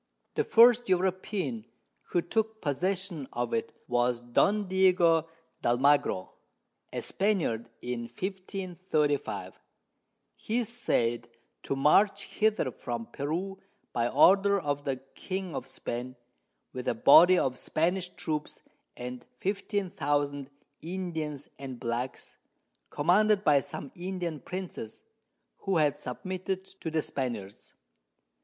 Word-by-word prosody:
The 445 - +1
first 240 - +6
European 185 - 0 0.5
who 175 - +1
took 220 +4 -1
possession 175 0 -1
of 120 0 -2
it 115 - -1 0.2
was 120 0 +1
Don 200 - +2
Diego 180 -4 +4 0.3
d'Almagro, 125 -5 +2 0.6
a - - -4
Spaniard, 165 - 0
in 120 -1 -3
1535. 185 - -2 0.8
He 225 - -2
is 240 -4 0
said 120 - 0 0.3
to - - -2
march 155 +9 +4
hither 215 -11 +1
from 120 -1 -5
Peru 175 +7 -3 0.3
by 120 0 +1
Order 195 +9 +5
of 145 -3 -2
the 135 -2 0 0.2
King 190 -2 -4
of - - -4
Spain, 125 +2 -5 0.6
with 125 -1 -5
a - - +1
Body 175 +10 +8
of 130 -6 +1
Spanish 175 +7 0
Troops 150 -1 -4 0.3
and 125 0 -6
15000 145 -9 -1 0.3
Indians 160 -5 -4
and 130 -3 -7
Blacks 120 +2 -4 0.5
commanded 205 +6 +3
by 145 -5 +5
some 135 - -6
Indian 175 -3 -4
Princes, 180 - -7 0.5
who 195 -3 0
had 150 -3 +2
submitted 185 +7 -4 0.2
to 160 - -2
the 160 -1 0
Spaniards. 115 -7 -5
160 Hz, 110 wpm, -29 LUFS, 130-190 Hz, 0.8 s, Body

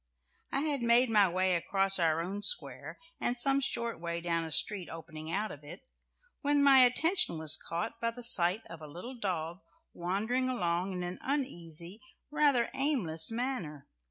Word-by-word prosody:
I 275 - 0
had 290 -3 -1
made 235 +1 +4
my 205 -3 +4
way 185 +1 +1
across 195 +3 +3
our 165 -1 +1
own 195 +4 -5
square - - 0 0.2
and 245 - -1
some 275 +3 +1
short 235 -6 -2
way 170 0 -4
down 170 -1 -1
a 160 - -6
street 185 +4 0
opening 160 -1 -8
out 210 +4 -2
of 145 - -11
it 165 +6 -11 0.6
when 285 -1 +2
my 275 -1 +7
attention 315 - +3
was 155 -1 +4
caught 170 +6 -5
by 230 - +1
the 245 +1 -9
sight 195 -2 +2
of 165 -1 -11
a 155 - -9
little 180 - -9
dog 175 -4 -3 0.3
wandering 220 +9 -2
along 180 -5 -1
in 180 -1 -4
an 180 +1 -6
uneasy, 180 - -3 0.3
rather 290 -5 +2
aimless 210 - +1
manner. 225 - -4
195 Hz, 170 wpm, -30 LUFS, 170-250 Hz, 0.6 s, my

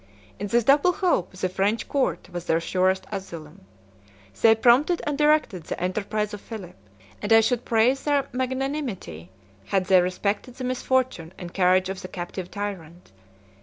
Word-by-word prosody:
In 205 - -3
this 235 +4 +2
double 285 +8 +4
hope, 350 - 0
the 185 0 -2
French 195 +5 -1
court 255 - -1
was 175 -1 -6
their 165 - +2
surest 185 +2 0
asylum; 165 - -8 0.8
they 225 0 +7
prompted 255 +10 +4
and 295 - -1
directed 295 - +2
the - - -5
enterprise 210 +3 -2
of 205 - -7
Philip; 210 -6 -9 0.5
and 210 - -4
I 225 - +8
should 240 +2 0
praise 240 +4 +2
their 285 -2 +1
magnanimity, 255 - -3 0.4
had 190 - 0
they 185 0 +5
respected 200 +6 -2
the 255 - -7
misfortune 255 -8 -1
and 175 -1 -8
courage 185 0 +3
of 190 0 -5
the 185 - -7
captive 180 0 -6
tyrant. 180 - -7
205 Hz, 160 wpm, -25 LUFS, 185-255 Hz, 0.8 s, I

